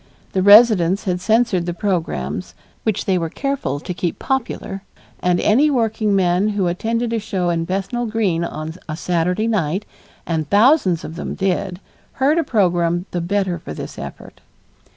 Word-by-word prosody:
The 190 - 0
residents 205 -2 +6
had 180 -3 -1
censored 215 -4 +2
the 175 - -2
programs, 90 - -2 0.3
which 215 -2 -1
they 190 -3 +2
were 165 -1 -2
careful 270 - -2
to 180 - -5
keep 175 -1 -3
popular, 235 -6 -3 0.4
and 180 -1 +1
any 270 +9 +4
workingman 210 -6 +1
who 190 - +2
attended 230 +7 -1
a 230 - +1
show 185 -4 -1
in 165 -1 -1
Bethnal 195 +7 -2
Green 205 -7 0
on 155 -1 -5 0.2
a 155 - -3
Saturday 180 +5 0
night, 195 -3 0 0.4
and 160 -3 -2
thousands 205 - +4
of 160 - -7
them - - -4
did, 185 -1 -1 0.3
heard 285 +5 +2
a - - +2
program 175 - +1
the 175 - -2
better 185 -1 -1
for 75 - -8
this - - -7
effort. - - -9
190 Hz, 160 wpm, -20 LUFS, 170-220 Hz, 0.4 s, residents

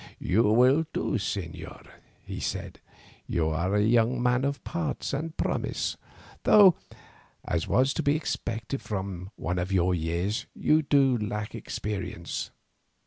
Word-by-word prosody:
"You 105 +5 +2
will 130 +9 +4
do, - - -1
señor," 90 -3 -5 0.4
he - - -6
said; - - -4 0.5
"you 80 -2 0
are 85 +5 0
a 105 - +3
young 115 +2 +3
man 125 +1 +2
of 140 0 -2
parts 165 -5 -3
and 160 +4 -3
promise, - - -1 0.5
though, 195 -5 +7 0.7
as 85 -2 -1
was 130 +1 +3
to - - -1
be 145 +1 +2
expected 120 -4 -3
from 95 -3 -4
one 90 +2 -2
of 90 +2 -2
your 90 -1 +3
years, 85 +5 -1
you 155 +1 +3 0.4
lack 105 0 -3
experience. 105 -2 -4
105 Hz, 135 wpm, -27 LUFS, 90-135 Hz, 0.7 s, though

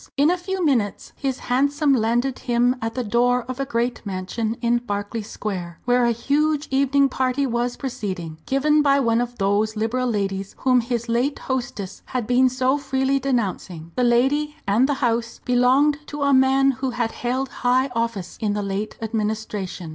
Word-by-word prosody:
In 290 +4 +4
a - - +2
few 375 0 -2
minutes 235 -9 0
his 270 -2 -2
hansom 280 +3 +1
landed 240 +2 +1
him 245 0 +2
at 225 0 -3
the 255 - -1
door 245 +3 +2
of 255 +2 -7
a 275 - -2
great 240 -1 -1
mansion 210 +3 -3
in 240 0 +2
Berkeley 205 -1 -4
Square, 185 -5 -5
where 245 0 +3
a 235 - +3
huge 290 +5 0
evening 275 +1 +3
party 260 +1 0
was 240 -1 -1
proceeding, 185 - -5
given 300 +3 +3
by 280 -1 +4
one 230 -3 +2
of 245 0 -4
those 205 +2 +1
Liberal 230 +4 -1
ladies 195 -2 -2
whom 255 -2 +3
his 235 0 -3
late 245 +5 0
hostess 240 -7 -4
had 250 -3 -2
been 250 +2 +4
so 260 +2 +1
freely 270 0 0
denouncing. 195 -10 -2
The 250 - +1
lady 270 +5 +2
and 225 +7 +3
the 285 - +1
house 230 0 -1
belonged 260 +4 +3
to 295 -1 -4
a 280 0 +3
man 265 +1 +4
who 265 0 -3
had 240 -2 -1
held 255 +2 -2
high 255 +2 +3
office 230 -5 -3
in 210 -2 0
the 205 0 -2
late 200 +2 -3
Administration. 215 -5 -3
245 Hz, 175 wpm, -22 LUFS, 220-270 Hz, -, In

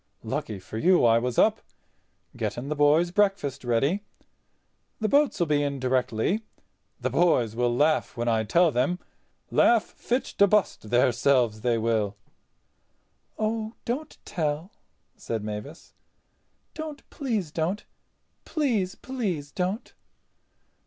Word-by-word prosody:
Lucky 105 - -3
for 95 +4 -7
you 180 0 +4
I 115 0 +5
was 125 0 -3
up—getting 125 +4 -3
the 150 - -1
boys' 150 +4 +4
breakfast 195 -10 +1
ready. 135 - +1 1.0
The 220 - +1
boats'll 280 -9 +3
be 150 -2 +2
in 140 -1 -2
directly. 130 - 0 0.6
The - - -2
boys 125 -11 +2
will 120 0 +1
laugh 150 -1 +1
when 120 0 -2
I 110 -1 +2
tell 170 +9 +3
them—laugh 180 - 0
fit 250 +3 -2 0.2
to 200 - +7
bust 195 - +1
their 125 +2 +4
selves 120 -3 +2
they 120 0 +1
will." 110 -3 0 1.2
"Oh, 220 +1 -2
don't 265 +6 -4
tell," 160 0 -2 0.5
said 110 -2 -4
Mavis, 105 +9 -7 0.8
"don't, 310 -2 -7
please 220 - -2
don't. 170 +6 -2 0.6
Please, 235 - 0
please 190 - -4
don't." 190 +5 -3
150 Hz, 120 wpm, -26 LUFS, -, 1.2 s, to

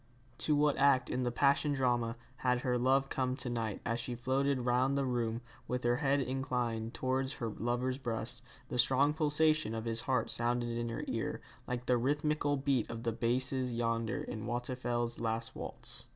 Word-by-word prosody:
To 150 - +2
what 145 -1 +3
act 135 -3 +4
in 130 - 0
the 125 -1 0
passion 140 +3 +3
drama 120 -3 +1 0.2
had 125 -1 +1
her 125 -1 +1
love 135 +2 +3
come 130 -1 -1
to 125 -2 -3
night 115 -4 -2
as 115 0 0
she 120 +1 -4
floated 130 +2 +1
round 130 +3 +2
the 140 - +1
room, 120 -2 -1 0.3
with 125 0 -2
her 120 0 +2
head 140 0 +2
inclined 125 -3 -2
towards 130 +1 0
her 115 - -3
lover's 120 +4 -1
breast, 120 -1 -3 0.3
the 125 - -3
strong 135 +4 +4
pulsation 155 -5 +2
of 110 0 -4
his 115 0 0
heart 130 -3 0
sounding 120 0 0
in 120 0 -2
her 115 - -4
ear, - - -2 0.3
like 125 0 -3
the 125 -1 +3
rhythmical 145 +3 +1
beat 135 -4 +1
of 115 0 -5
the 115 - +1
basses 125 +2 +1
yonder 115 -2 -1
in 110 +1 -5
Waldteufel's 120 -1 -2
last 115 0 -2
waltz? - - -1
125 Hz, 180 wpm, -33 LUFS, 115-135 Hz, 0.3 s, act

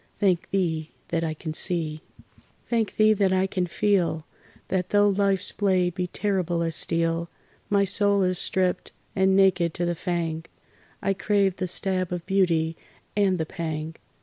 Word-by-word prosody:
Thank 185 -5 +1
Thee 165 -5 -1 0.2
that 165 -1 0
I 160 -1 -2
can 155 0 -6
see! 155 -3 -1 0.7
Thank 230 -3 0
Thee 215 0 +5
that 200 -2 +2
I 190 0 +2
can 185 -2 -2
feel! 170 -4 +1 0.4
That 185 -2 -1
though 205 0 +4
life's 200 -1 +1
blade 185 -3 +1
be 180 0 -2
terrible 180 -4 -1
as 165 -1 -2
steel, 165 0 0 0.4
My 200 -1 +3
soul 200 0 +3
is 185 -1 +1
stript 185 -1 0 0.2
and 190 0 +3
naked 185 -4 +3
to 175 - -1
the 175 - 0
fang, 165 -2 -3 0.6
I 195 - +2
crave 195 -1 +1
the 185 - -2
stab 185 0 -1
of 175 -1 -4
beauty 170 -4 +1 0.4
and 195 -3 +2
the 160 - -1
pang. 160 -1 -5
180 Hz, 160 wpm, -25 LUFS, 165-195 Hz, 0.7 s, Thee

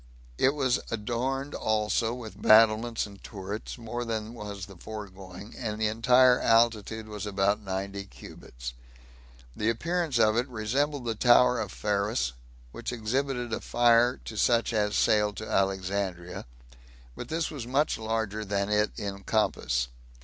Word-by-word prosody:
It 135 +3 +4
was 130 -4 +1
also - - -4
adorned 130 +6 -2 0.7
with 110 -3 -9
battlements 110 +1 +5
and 100 -2 -13
turrets, 100 +3 -6
more 120 +1 -4
than 110 -1 -4
was 105 -4 -6
the 100 -1 -13
foregoing, 100 0 -9
and 110 -3 -4
the 110 - +1
entire 125 +3 +5
altitude 115 -1 +2
was 105 -1 -6
about 100 +1 +1
ninety 100 0 -4
cubits; - - -10 0.8
the 110 - 0
appearance 165 +3 0
of 110 -1 +4
it 125 +2 +1
resembled 130 +4 -1
the 115 - 0
tower 120 +2 +5
of 105 -4 -3
Pharus, 100 - -1 0.4
which - - -5
exhibited 120 +1 -2
a - - -2
fire 120 +1 +4
to 110 - -7
such 115 +2 +2
as 105 -1 +1
sailed 105 -1 +2
to 110 - -6
Alexandria, 95 -4 -1 0.7
but 125 - -7 0.2
was 135 -6 -6
much 140 +2 +1
larger 110 -1 -2
than 100 -1 -1
it 105 0 +2
in 100 -3 -5
compass. - - 0
110 Hz, 140 wpm, -28 LUFS, 100-120 Hz, 0.8 s, battlements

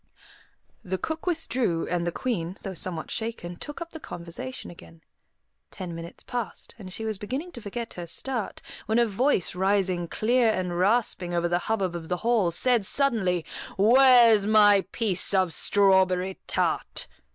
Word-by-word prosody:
The 190 0 -2
cook 320 - -5
withdrew, 255 - 0
and 175 0 -1
the - - 0
Queen, 190 -5 -3
though 195 - -4
somewhat 170 -2 -4
shaken, 220 -6 -4
took 295 - -8
up 335 - -18
the 320 - -8
conversation 165 - -7
again. 85 -1 -15 0.7
Ten 180 -2 -7
minutes 165 0 -9
passed, 240 -4 -5
and 185 -3 -9
she 220 +4 -4
was 215 -3 -2
beginning 265 - -4
to 240 - -10
forget 230 +3 -6
her 175 -1 -7
start, 240 +4 -3 0.2
when 220 +2 +1
a 240 - +5
voice, 225 - +1
rising 185 -2 +1
clear 235 +5 +2
and 180 -4 -2
rasping 190 -3 +1
over 170 0 +1
the 175 0 +1
hubbub 195 -5 0
of 165 -2 -7
the 180 - 0
hall, 230 -7 +3
said 235 +6 +2
suddenly, 195 - +1 0.3
"Where's 235 -1 +6
my 205 -3 +5
piece 200 -4 0
of 185 -3 +2
strawberry 190 -1 +2
tart?" - - -1
195 Hz, 160 wpm, -26 LUFS, 175-235 Hz, 0.7 s, Where's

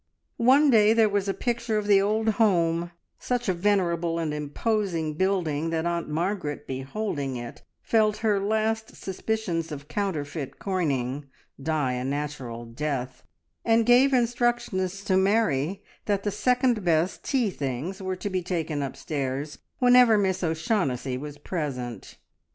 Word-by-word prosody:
One 270 +5 +5
day 215 -2 +6
there 225 -1 +5
was 200 -1 0
a - - +1
picture 235 -2 -1
of 210 - -1
the 200 -1 +5
old 215 +2 0
home 170 -5 +2 0.3
such 245 -2 -2
a 190 - +2
venerable 170 -3 +1
and 160 -2 -1
imposing 165 +2 -1
building 165 -3 0
that 165 0 -1
Aunt 170 -1 -1
Margaret, 160 -2 -2
beholding 135 0 -3
it, 120 -1 -8 0.2
felt 215 -2 +2
her 210 -2 +3
last 220 +2 -1
suspicions 190 -4 -3
of 145 -1 -7
counterfeit 150 -8 -3
coining 140 -7 -2 0.3
die 150 -3 0
a 125 0 -3
natural 135 -4 -4
death, 130 +1 -4 0.4
and 225 0 +3
gave 250 +3 +6
instructions 235 -6 0
to 190 -2 +2
Mary 190 -3 +1 0.2
that 200 -2 0
the 205 - 0
second 250 -2 +1
best 170 +1 +1
tea 250 -7 +1
things 145 +7 -4
were 190 0 -2
to 205 +3 -4
be 185 -1 0
taken 165 -4 -2
upstairs 140 +1 -4 0.2
whenever 245 -3 +6
Miss 190 -2 0
O'Shaughnessy 160 - 0
was 145 +2 -7
present. 125 - -5
180 Hz, 140 wpm, -26 LUFS, 150-215 Hz, 0.4 s, day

